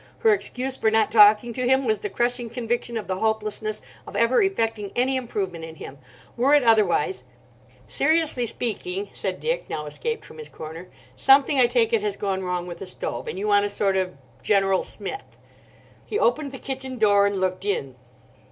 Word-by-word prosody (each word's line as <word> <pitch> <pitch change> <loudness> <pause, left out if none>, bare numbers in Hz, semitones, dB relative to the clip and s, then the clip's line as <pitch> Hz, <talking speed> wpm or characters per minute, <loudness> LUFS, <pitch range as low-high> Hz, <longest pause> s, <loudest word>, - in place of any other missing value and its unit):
Her 445 - +5
excuse 265 -9 -1
for 220 - +2
not 220 -1 +2
talking 215 +2 +6
to 250 +1 -1
him 265 +1 +3
was 215 -3 +1
the 205 - -4
crushing 240 +2 -1
conviction 235 0 -3
of 215 - -4
the 185 0 -3
hopelessness 215 0 -2 0.2
of - - -9
ever 230 +2 +3
effecting 225 - -1
any 260 +2 +1
improvement 195 -9 -3
in 160 0 -8
him. 140 -3 -10 0.4
Were 270 +5 +4
it 290 - +4
otherwise— 225 - +2 0.6
"Seriously 315 -7 +1
speaking," 365 - -3
said - - -3
Dick, - - -2
now 150 - -4
escaped 460 - -4
from - - -13
his 460 - -7
corner, 160 +3 -9 0.3
"something, 275 +1 +4
I 245 - +6
take 235 -2 +1
it, 225 - +3
has 205 -1 -2
gone 190 -2 -2
wrong 180 -1 -2
with 175 -1 -8
the 195 - -7
stove, 180 - -3
and - - -5
you 205 +2 -3
want 205 -1 +4
a 205 - -1
sort 200 -1 0
of 185 -4 -2 0.2
general 195 0 +2
smith." 215 - -6 0.7
He 420 - -3
opened 280 - +1
the 265 - -8
kitchen 265 -1 -6
door 205 -2 +4
and 200 -1 -2
looked 185 0 -1
in. 165 -10 -2
220 Hz, 190 wpm, -24 LUFS, 195-260 Hz, 0.7 s, talking